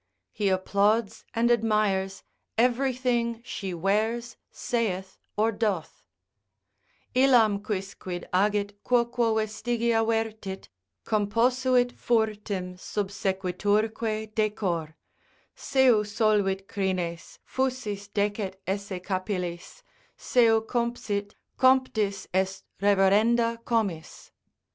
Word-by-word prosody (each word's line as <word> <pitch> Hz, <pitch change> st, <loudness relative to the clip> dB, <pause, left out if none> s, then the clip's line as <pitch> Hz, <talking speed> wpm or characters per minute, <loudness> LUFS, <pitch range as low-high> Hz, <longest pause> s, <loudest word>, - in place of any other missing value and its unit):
He 205 Hz, -2 st, 0 dB
applauds 200 Hz, +3 st, +1 dB
and 235 Hz, +1 st, +3 dB
admires 210 Hz, -4 st, +1 dB, 0.3 s
everything 245 Hz, -1 st, +1 dB
she 195 Hz, -5 st, -5 dB
wears, 215 Hz, +7 st, 0 dB
saith 190 Hz, -6 st, -3 dB, 0.2 s
or 220 Hz, +2 st, +3 dB
doth, 205 Hz, -6 st, -2 dB, 1.1 s
Illam 240 Hz, -6 st, +5 dB
quicquid 190 Hz, -3 st, -5 dB
agit, 205 Hz, +1 st, +1 dB
quoquo 235 Hz, -2 st, +2 dB
vestigia 225 Hz, +1 st, 0 dB
vertit, 220 Hz, -3 st, -2 dB, 0.4 s
Composuit 245 Hz, +4 st, +2 dB
furtim 205 Hz, -5 st, -1 dB
subsequiturque 205 Hz, +3 st, -1 dB
decor; 185 Hz, -8 st, -1 dB, 0.6 s
Seu 255 Hz, -5 st, +3 dB
solvit 205 Hz, -2 st, +1 dB
crines, 180 Hz, -4 st, -3 dB
fusis 250 Hz, -6 st, -2 dB
decet 205 Hz, -1 st, -1 dB
esse 195 Hz, -1 st, -3 dB
capillis, 185 Hz, -, -4 dB, 0.3 s
Seu 225 Hz, -3 st, +3 dB
compsit, 225 Hz, -4 st, -2 dB, 0.2 s
comptis 230 Hz, -7 st, +2 dB
est 190 Hz, +1 st, 0 dB, 0.2 s
reverenda 220 Hz, +4 st, +3 dB
comis. 200 Hz, -9 st, -2 dB
210 Hz, 80 wpm, -27 LUFS, 195-230 Hz, 1.1 s, Illam